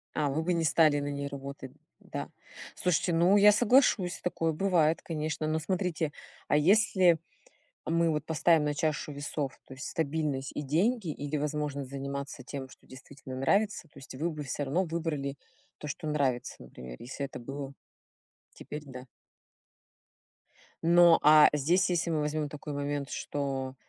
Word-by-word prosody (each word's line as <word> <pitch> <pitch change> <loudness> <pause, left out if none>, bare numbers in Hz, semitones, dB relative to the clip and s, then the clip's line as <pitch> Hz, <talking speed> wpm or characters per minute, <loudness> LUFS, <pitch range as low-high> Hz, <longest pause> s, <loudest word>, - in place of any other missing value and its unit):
А, 150 -2 +1
вы 155 +4 -1
бы 180 +2 +1
не 165 - 0
стали 155 -1 +4
на 145 - -3
ней 140 0 -3
работать. 140 -1 -8 0.3
Да. - - -6 0.5
Слушайте, 180 0 +1
ну 175 +5 +5
я 205 +1 +8
соглашусь, 210 -5 +3
такое 165 -2 0
бывает, 165 -3 +2
конечно, 155 -1 -3
но 155 +1 0
смотрите, 165 -2 -1 0.4
а - - +2
если 185 0 +4 0.7
мы 165 0 +2
вот 150 -1 -1
поставим 160 0 +3
на 150 0 0
чашу 150 0 -1
весов, 145 -1 -4
то 135 - -10
есть 135 - -7
стабильность 145 -3 -2
и - - -3
деньги 185 - +1
или 145 0 -3
возможность 145 -2 -3
заниматься 140 -1 -5
тем, 130 +1 -7
что - - -18
действительно 130 0 -10
нравится, 195 +5 +1
то - - -16
есть 135 - -11
вы 160 +6 -1
бы 155 -1 -6
всё 145 +1 -3
равно 160 +8 0
выбрали 160 -5 -3 0.4
то, - - -8
что 155 +3 -5
нравится, 140 -5 -1
например, 60 0 -10
если 135 +3 -5
это 135 - -9
было. 135 +2 -7 0.8
Теперь, 150 0 -8
да. 130 -1 -9 1.8
Но, 170 0 +6
а 150 0 +8
здесь, 170 +7 +2
если 175 -1 0
мы 160 -2 0
возьмем 150 0 -1
такой 150 +1 -7
момент, 145 -1 -3
что, 135 -2 -3
150 Hz, 160 wpm, -29 LUFS, 140-165 Hz, 1.8 s, я